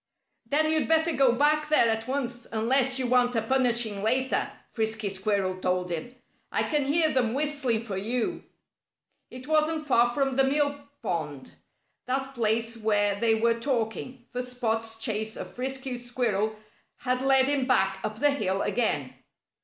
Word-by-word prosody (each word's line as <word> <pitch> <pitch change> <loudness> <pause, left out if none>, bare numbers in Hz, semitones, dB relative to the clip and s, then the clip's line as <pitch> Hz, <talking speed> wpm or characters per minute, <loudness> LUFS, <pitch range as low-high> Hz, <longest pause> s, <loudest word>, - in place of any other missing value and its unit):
"Then 310 +2 +2
you'd 315 -1 +2
better 320 +1 +3
go 270 -5 +3
back 300 +3 +2
there 305 -6 +5
at 225 0 -1
once, 245 -3 -3
unless 250 +4 +2
you 260 - -1
want 245 0 +2
a 225 - +2
punishing 235 -4 +1
later," 255 +5 +1 0.2
Frisky 220 -2 -1
Squirrel 190 -1 -1
told 180 -1 -1
him. 170 +10 -5 0.4
"I - - +1
can 295 -3 0
hear 310 +2 +3
them 245 -3 +1
whistling 280 -6 0
for 205 -4 -5
you." 245 - -2 0.9
It 255 0 -10
wasn't 310 0 +1
far 240 -4 +3
from 270 0 -1
the 270 - +5
mill 285 +1 +2 0.3
pond 150 -9 -4 0.6
that 270 +1 -2
place 230 -1 0
where 205 -2 +1
they 225 0 +3
were 230 +1 +1
talking, 240 0 -3
for 250 - -3
Spot's 225 -3 -2
chase 220 -1 -2
of - - -7
Frisky 265 0 -4
Squirrel 230 -4 -1 0.5
had 255 0 0
led 265 -1 +4
him 275 -2 +1
back 195 -6 +2
up 215 0 -3
the 290 +1 +4
hill 195 -8 0
again. 145 - -1
245 Hz, 160 wpm, -27 LUFS, 220-270 Hz, 0.9 s, there